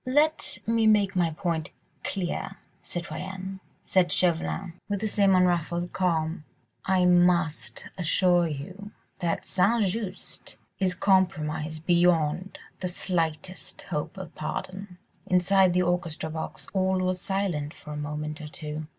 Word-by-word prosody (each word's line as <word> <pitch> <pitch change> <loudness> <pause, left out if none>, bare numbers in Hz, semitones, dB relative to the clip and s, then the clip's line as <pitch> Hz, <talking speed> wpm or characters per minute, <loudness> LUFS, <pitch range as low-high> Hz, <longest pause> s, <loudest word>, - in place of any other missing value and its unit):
"Let 300 +4 +2
me 225 0 +3
make 205 -2 +4
my 175 -2 +3
point 160 -1 -2 0.3
clear, 195 +1 -3 0.2
citoyenne," 185 +3 -5 0.2
said 185 -2 +3
Chauvelin, 175 +1 +1 0.2
with 205 -1 0
the 215 - -1
same 200 -2 +4
unruffled 175 -1 +1
calm, 165 -3 0 0.4
"I 185 -1 +3
must 175 -2 +2
assure 175 0 +3
you 180 +8 -7 0.3
that 175 -3 -1
St. 205 +4 +3
Just 195 +1 -5 0.2
is 185 -2 +2
compromised 160 -5 +1
beyond 175 0 +2 0.2
the 185 - -2
slightest 175 -1 -3
hope - - -4
of - - -7
pardon." 190 0 -5 0.3
Inside 185 0 +4
the 180 0 +3
orchestra 170 -3 -1
box 160 0 -5
all 190 -1 +2
was 185 0 0
silent 185 -7 -1
for 150 - -11
a - - -5
moment 150 +1 -4
or 155 - -6
two. 150 0 -6
180 Hz, 130 wpm, -27 LUFS, 160-190 Hz, 0.4 s, make